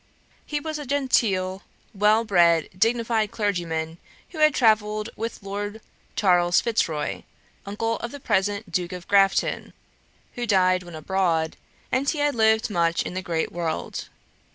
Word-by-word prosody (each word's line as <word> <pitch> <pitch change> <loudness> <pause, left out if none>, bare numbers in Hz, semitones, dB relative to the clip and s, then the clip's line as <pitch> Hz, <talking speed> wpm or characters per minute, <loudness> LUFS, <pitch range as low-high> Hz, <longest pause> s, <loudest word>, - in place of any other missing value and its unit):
He 295 - -2
was 310 0 -5
a 295 - -6
genteel 205 -9 +1 0.3
well 210 +2 +3
bred 170 -6 +3
dignified 225 +1 +1
clergyman, 170 -6 -2 0.3
had 305 -3 +3
travelled 215 -2 +2
with 225 -1 -5
Lord 205 +2 -5 0.4
Charles 175 -3 +4
Fitzroy, 165 -10 -1 0.5
uncle 225 +3 -2
of 235 - -6
the 285 - -8
present 205 -3 -1
Duke 175 +1 -2
of 180 -1 -8
Grafton, 195 -1 +2 0.6
who 240 -1 -4
died 185 -3 +3
when 175 -2 -10
abroad, 165 -1 0 0.4
and 275 +2 +1
he 315 - -1
had 290 0 +1
lived 220 0 +2
much 170 -2 +1
in - - -6
the 185 - -3
great 165 -3 -2
world. 170 -2 -4
205 Hz, 140 wpm, -24 LUFS, 175-230 Hz, 0.6 s, Charles